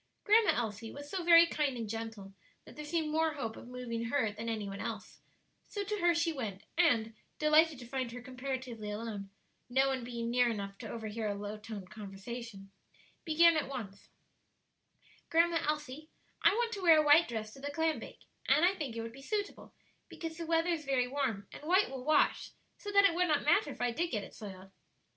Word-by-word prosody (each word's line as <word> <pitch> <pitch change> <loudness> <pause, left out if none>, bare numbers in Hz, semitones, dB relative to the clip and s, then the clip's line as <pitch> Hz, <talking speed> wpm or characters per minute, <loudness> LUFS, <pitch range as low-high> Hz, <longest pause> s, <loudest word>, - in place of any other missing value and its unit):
Grandma 435 +1 +5
Elsie 225 -1 -3
was 285 0 -9
so 375 -2 -2
very 335 0 +8
kind 290 -6 -1
and 230 -2 -4
gentle 225 -3 -6 0.3
that - - -13
there 300 - -7
seemed 315 0 -1
more 320 0 +2
hope 225 -6 -4
of - - -11
moving 245 -2 -4
her 230 -3 +1
than 225 +2 -5
any 215 -3 -3
one 195 0 -6
else; - - -6 0.5
so 410 - -4
to 415 +1 -3
her 345 -1 +3
she 335 0 +1
went, 215 -9 -5
and, 235 -10 +3 0.2
delighted 305 0 +4
to 245 - -10
find 255 -1 -3
her 245 - -7
comparatively 255 -3 -5
alone, 210 -2 -5 0.4
no 265 +2 +3
one 265 -2 -1
being 235 -1 -4
near 245 0 +4
enough 200 -3 -4
to - - -7
overhear 220 -1 -4
a 205 - -2
low 205 +1 -5
toned 210 -3 -8
conversation, 205 0 -8 0.5
began 335 +1 +5
at 305 -3 -1
once: 210 -7 -7 1.2
"Grandma 335 0 +3
Elsie, 300 0 -4 0.3
I - - +6
want 475 0 0
to 405 -3 -5
wear 330 -3 +7
a 305 - +3
white 300 +3 +7
dress 215 -2 -5
to - - -13
the 285 +1 -4
clam 320 +2 0
bake; - - -11 0.2
and 295 +5 +5
I 370 - +4
think 295 -11 -5
it 230 - -3
would 230 0 -7
be 270 - -12
suitable, 410 +7 -4 0.4
because 325 -1 -6
the 335 0 -6
weather 330 +1 +2
is 325 -2 -2
very 265 -3 +1
warm, 250 -7 -2
and - - -10
white 365 +5 +3
will 265 -2 -6
wash, 305 +2 +2 0.3
so 410 - -6
that 400 0 +6
it 385 - +5
would 360 +1 +2
not 300 -3 +2
matter 300 0 +4
if - - -8
I 245 0 +1
did 340 +9 -1
get 210 -7 -2
it - - -11
soiled." 195 -2 -10
260 Hz, 210 wpm, -32 LUFS, 225-320 Hz, 1.2 s, very